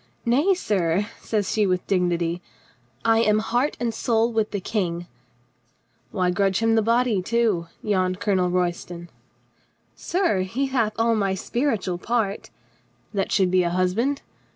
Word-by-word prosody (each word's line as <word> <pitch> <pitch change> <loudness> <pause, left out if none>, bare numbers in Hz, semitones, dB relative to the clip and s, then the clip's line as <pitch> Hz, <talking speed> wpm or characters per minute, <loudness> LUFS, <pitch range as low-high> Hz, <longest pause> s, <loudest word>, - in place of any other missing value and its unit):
"Nay, 290 +12 +3
sir," 195 - 0
says 210 -3 -1
she 210 -2 +2
with 180 -1 0
dignity, 175 -2 0 0.6
"I 225 0 +4
am 215 -2 +3
heart 245 +6 0
and 235 -2 -1
soul 230 +1 +1
with 220 -1 +1
the 205 - -3
King." 175 -4 -2 1.0
"Why 180 -1 0
grudge 195 0 +1
him 225 0 +2
the 225 - +4
body, 230 -2 +2
too?" 215 -4 +1 0.2
yawned 185 -3 0
Colo 205 -4 +1
nel 180 -1 +1
Royston. 175 -1 -2 0.8
"Sir, 350 - 0
he 230 +9 -1
hath 235 -5 0
all 230 0 +3
my 195 -3 0
spiritual 205 -5 -1
part 215 -2 -1 0.2
— - - -37
" - - -38
"That 195 -2 -1
should 190 -3 +2
be 185 0 +4
a 175 - +1
husband?" 185 +11 0
205 Hz, 155 wpm, -24 LUFS, 180-230 Hz, 1.0 s, I